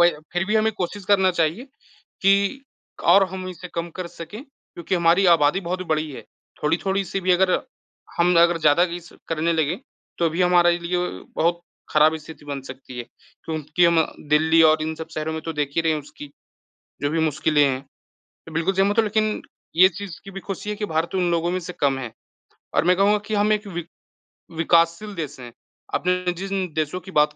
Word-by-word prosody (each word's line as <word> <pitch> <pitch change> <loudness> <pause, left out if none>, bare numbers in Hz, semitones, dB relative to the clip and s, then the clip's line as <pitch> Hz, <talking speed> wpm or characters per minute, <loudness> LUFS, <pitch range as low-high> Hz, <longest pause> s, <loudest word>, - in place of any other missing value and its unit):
वही 175 0 +7 0.2
फिर 175 +1 0
भी 215 - 0
हमें 220 +1 +2
कोशिश 200 0 -4
करना 190 -2 +4
चाहिए 170 - 0 0.6
कि 200 +7 +3 0.5
और 195 +3 +7
हम 185 0 -6
इसे 180 0 -8
कम 170 0 -2
कर 185 -1 -4
सकें, 175 +8 -9
क्योंकि 190 - -7
हमारी 175 +2 +4
आबादी 165 +2 +4
बहुत 185 +1 -3
बड़ी 155 -1 0
है। - - -8 0.4
थोड़ी-थोड़ी 190 +5 0
सी 195 +2 -3
भी 185 - 0
अगर 185 +1 +3 0.7
हम 175 +1 +4
अगर 170 0 +4
ज़्यादा 160 +2 +4
ये 175 0 -4
सब 175 - -17
करने 165 +1 0
लगे, 160 +1 0 0.4
तो 170 -1 +3
भी 170 +3 0
हमारे 175 -1 +4
लिए 175 +1 -2 0.4
बहुत 170 +1 +1 0.3
ख़राब 155 +1 +4
स्थिति 155 -1 -12
बन 140 -2 -5
सकती 130 -1 -10
है, 120 - -4 0.4
क्योंकि 155 +2 0
हम 165 -2 +4 0.3
दिल्ली 160 +2 +5
और 155 0 +1
इन 160 0 -2
सब 160 0 -8
शहरों 155 +1 -2
में 160 - -4
तो 165 - -4
देख 150 -2 -2
ही - - +4
रहे 160 -1 +2
हैं 155 - -2
उसकी 145 0 -12 0.7
जो 145 - +1
भी 165 0 0
मुश्किलें 150 -1 +2
हैं, 135 -2 +1
मैं 135 +1 -21 0.5
बिल्कुल 170 +4 0
सहमत 195 +2 +2
हूँ, - - +5
लेकिन 215 0 0 0.3
ये 185 +3 +7
चीज़ 190 -1 -8
की 195 - -10
भी 195 - -6
खुशी 195 +2 -6
है 210 - -2
कि 210 0 -3
भारत 165 +2 -2
उन 180 -2 +1
लोगों 170 +1 0
में 185 - -1
से 180 +1 -7
कम 140 -2 +2
हैं। 120 -3 -6 0.6
और 145 - +3
मैं 180 +1 +4
कहूँगा 205 +2 +4
कि 215 - -2
हम 210 +1 +3
एक 210 0 -1
विक 175 -4 -5 0.7
विकासशील 170 +5 +2
देश 155 -6 -5
हैं, 120 -2 -9 0.4
आपने 180 0 0
जिन 190 +1 -3
देशों 155 +3 -1
की 190 - -11
बात 150 -2 +3
170 Hz, 205 wpm, -23 LUFS, 155-190 Hz, 0.7 s, वही